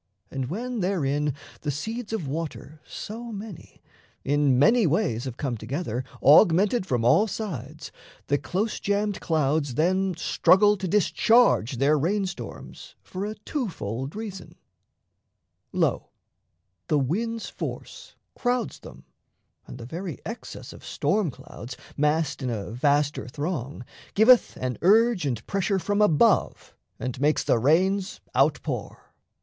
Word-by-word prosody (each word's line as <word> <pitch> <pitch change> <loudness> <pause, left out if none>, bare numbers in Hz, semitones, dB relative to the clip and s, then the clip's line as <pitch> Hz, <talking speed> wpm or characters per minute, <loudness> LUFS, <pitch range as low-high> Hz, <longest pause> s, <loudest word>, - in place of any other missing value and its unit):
And 130 -2 -3
when 240 +7 -3
therein 150 -7 0 0.3
The 150 - -3
seeds 220 - -4
of 210 -10 -3
water 155 0 -5
so 230 +2 -7
many 205 -4 -9 0.4
in 140 -2 +2
many 210 - +5
ways 145 - 0
Have 130 -2 -6
come 130 -5 -2
together, 130 -1 -3 0.2
augmented 185 - +5
from 120 -3 0
all 170 - +5
sides, 155 - -6 0.3
The 145 0 +1
close 210 +5 -2
jammed 205 0 -1
clouds 150 -4 0
then 185 +4 +1
struggle 205 +4 +4
to 190 0 -3
discharge 210 - +3
Their 145 +4 +3
rain 195 +7 +1
storms 190 - -8
for 190 +2 -5
a 215 - -5
two 265 -8 -2
fold 130 - -5
reason: 210 -3 -7 1.2
lo, - - 0 0.8
The 150 - +2
wind's 220 - -1
force - - -7 0.2
crowds 245 -2 -1
them, - - -13 0.6
and - - -9
the 115 - -8
very 170 +5 -5
excess 230 +3 -8
Of - - -14
storm 210 -6 0
clouds 125 -1 -10 0.2
(massed 150 0 0
in 130 - -2
a 105 -3 -4
vaster 145 0 +1
throng) 145 -2 -4 0.3
Giveth 235 +4 +5
an 125 -1 -3
urge 210 -1 +4
and 125 -4 -3
pressure 195 0 0
from 205 +3 0
above 165 -9 +2 0.3
And 125 0 -4
makes 150 +1 +2
the 115 - +2
rains 185 - +2
out - - +2
pour. - - -6
165 Hz, 135 wpm, -25 LUFS, 140-205 Hz, 1.2 s, many